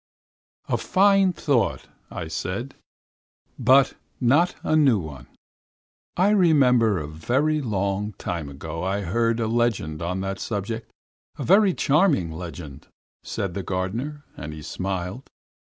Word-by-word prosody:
"A - - +1
fine 195 -1 +4
thought," 140 - 0 0.2
I 80 - -6
said. 95 +10 -4 0.9
"But 135 +1 +5
it's - - -22 0.2
not 145 +8 +3
a 155 - +1
new 140 -7 +5
one. 75 -8 -8 0.9
I 190 +4 +4
remember 130 - +4
a 75 -3 -4
very 130 - 0
long 100 -3 -1
time 85 -5 -4
ago 80 +4 -6
I 95 +2 -1
heard 115 +5 0
a 115 - 0
legend 110 -9 0
on 90 +3 -2
that 95 0 -3
subject. 110 +1 -4 0.5
A - - -4
very 195 0 +5
charming 145 - +2
legend," 80 -4 -8 0.3
said 95 -3 -4
the 100 - -3
gardener, 115 +12 -3
and 75 +1 -7
he 75 -1 -9
smiled. 95 - -4
110 Hz, 135 wpm, -24 LUFS, 90-140 Hz, 0.9 s, But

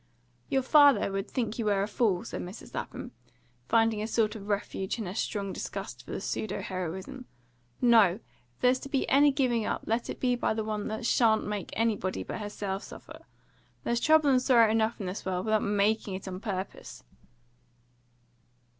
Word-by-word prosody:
"Your 265 -1 +1
father 285 -7 +5
would 195 +1 -3
think 235 -2 -2
you 230 - -1
were 200 -2 +2
a - - -2
fool," 205 -4 +1
said - - -5
Mrs. 185 +5 -9
Lapham, - - -6 0.6
finding 225 -2 +3
a 215 - -2
sort 225 -1 +1
of 205 -2 -8
refuge 200 -1 -2
in 225 - -4
her 180 - -5
strong 200 -2 -2
disgust - - -6
for - - -17
the - - -3
pseudo 210 -2 -3
heroism. 190 +8 -5 0.5
"No! 225 -7 +6 0.4
If - - -35
there's 255 +1 +4
to 275 - -9
be 275 -1 0
any 285 +2 +5
giving 255 -5 +1
up, - - -2
let 230 +2 -1
it - - -5
be 250 -1 +2
by 240 - 0
the 220 - -1
one 215 -1 -3
that 220 +1 -4
shan't 225 -2 +3
make 210 -2 -4
anybody 215 -4 -1
but - - -6
herself 205 -1 -4
suffer. - - -11 0.6
There's 235 0 0
trouble 310 0 +4
and 255 -1 +4
sorrow 235 -4 +5
enough 225 +1 +1
in 200 - -4
the 185 +2 -4
world, 185 -1 -2
without 215 -1 +2
MAKING 205 0 +1
it 190 - -7
on 185 -1 -5
purpose!" 195 -3 -6
220 Hz, 185 wpm, -29 LUFS, 200-240 Hz, 0.6 s, No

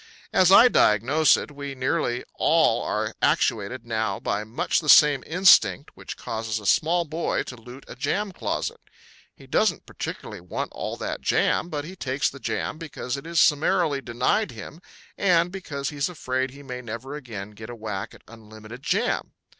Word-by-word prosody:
As 185 0 +5
I 230 +5 +9
diagnose 140 - +4
it, - - -6
we 140 -1 -7
nearly 125 -1 -1
all - - +3
are - - -2
actuated 115 +3 0
now 110 -4 -2
by 105 +1 -2
much 110 +3 -1
the 150 - -5
same 145 -3 +7
instinct 160 - +4
which - - -9
causes 110 -1 -3
a 105 - -12
small 170 - +2
boy 160 +2 -2
to 125 - -9
loot 125 +3 -12
a - - -9
jam 190 +10 -1
closet. - - -3 0.6
He - - -16
doesn't - - +1
particularly - - -7
want 90 - -5
all - - -5
that - - -4
jam - - +1
but 150 -2 -4
he 185 +4 -9
takes 135 -4 -1
the 140 - -11
jam 155 - -3
because 140 -5 -5
it 140 +3 -8
is 170 -1 +1
summarily 150 -1 +3
denied 130 - 0
him 125 +9 -10 0.4
and 175 -3 +3
because 150 -8 -5
he's 145 +2 -1
afraid 130 -6 -2
he 140 +2 -13
may 125 -2 -6
never 115 +3 -7
again 110 -8 -7
get 110 +2 -11
a 120 - -7
whack 105 -4 -5
at - - -19
unlimited 110 +1 -12
jam. - - -1
135 Hz, 175 wpm, -25 LUFS, 115-155 Hz, 0.6 s, I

